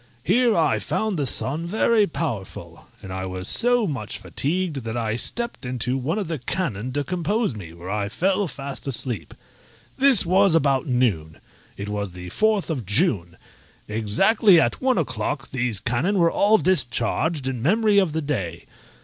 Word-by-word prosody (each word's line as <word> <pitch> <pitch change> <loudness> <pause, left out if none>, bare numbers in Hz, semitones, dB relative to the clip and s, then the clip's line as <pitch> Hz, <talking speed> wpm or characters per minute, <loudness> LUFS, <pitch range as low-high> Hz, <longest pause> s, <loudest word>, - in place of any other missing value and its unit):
Here 235 - +3
I - - +2
found 220 -2 -2
the 140 - 0
sun 155 +7 -1
very 215 +2 +2
powerful, 125 - -6 0.2
and 95 - -7
I 95 0 -4
was 95 0 -5
so 245 -1 +3
much 135 - -4
fatigued 150 - -2
that 115 -2 -4
I 110 -2 -1
stepped 235 - -2
into 125 0 -1
one 135 +8 -2
of 205 -5 -2
the 160 -3 -3
cannon 125 - -3
to 145 +1 -1
compose 180 - -1
me, 90 -6 -9
where 85 +3 -8
I 105 -1 -2
fell 190 - 0
fast 140 -2 -7
asleep. 125 -3 -4 0.6
This 265 -8 +5
was 185 0 +4
about 140 -4 +2
noon: 105 - 0 0.4
it 100 - -5
was 100 -3 -4
the 90 0 -8
fourth 215 - +1
of 135 -7 -3
June; 100 - +2 0.5
exactly 170 - +3
at 120 - 0
one 260 -1 +2
o'clock 125 -3 -3
these 125 -5 -1
cannon 130 - 0
were 170 -2 +3
all 210 +2 +4
discharged 160 - +2
in 130 -3 -3
memory 210 - +3
of 190 -5 +1
the 160 0 -2
day. 95 - -4
140 Hz, 165 wpm, -23 LUFS, -, 0.6 s, This